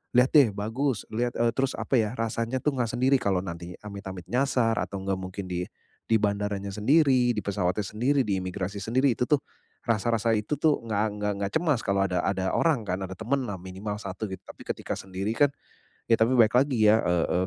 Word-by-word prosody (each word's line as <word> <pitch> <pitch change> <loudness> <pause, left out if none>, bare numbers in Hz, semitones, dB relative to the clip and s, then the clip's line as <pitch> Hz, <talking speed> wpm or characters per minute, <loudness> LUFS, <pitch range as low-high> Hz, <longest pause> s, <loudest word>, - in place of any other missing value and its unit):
lihat 125 +1 +5
deh 140 -7 +6
bagus 115 +2 -1
liat" 120 +2 -1
Eee, 120 0 +3
terus 135 -1 0
apa 130 - +1
ya 110 +2 -1
rasanya 115 +2 -1
itu 150 - +2
enggak 125 -3 0
sendiri 130 +3 +3
kalau 95 -2 +1
nanti 85 -1 -7
amit-amit 100 -3 -7
nyasar 125 -3 +2
atau 100 - -3
enggak 95 -1 -1
mungkin 95 +1 -6
di 90 0 -2 0.4
di 110 -2 +2
bandaranya 100 -1 -1
sendiri 125 +3 +3
di 105 - -2
pesawatnya 95 0 -1
sendiri 125 +8 +1
di 100 -5 0
imigrasi 95 +2 -4
sendiri 120 +5 +1
itu 125 - +1
tuh 145 +1 +2 0.5
rasa-rasa 115 0 +2
itu 105 +8 -2
tuh 150 +1 +2
enggak 105 -2 0 0.2
nggak 105 0 -1
nggak 100 0 -1
cemas 155 -8 +1
kalau 100 -2 +1
ada 90 -2 0
ada 95 -1 -1
orang 145 -10 +2
kan 90 0 -2
ada 95 -1 -6
temen 130 +5 0
lah 95 - -4
minimal 95 +3 -6
1 100 +1 -5
gitu. 95 - -5
Tapi - - -12
ketika - - -3
sendiri 95 +3 -4
kan 145 +4 +4 0.6
ya 115 - +5
tapi 115 +3 +3
balik 120 +1 +5
lagi 120 -7 +4
ya, 110 - +5
eee, 90 +1 +1
110 Hz, 205 wpm, -27 LUFS, 95-125 Hz, 0.6 s, deh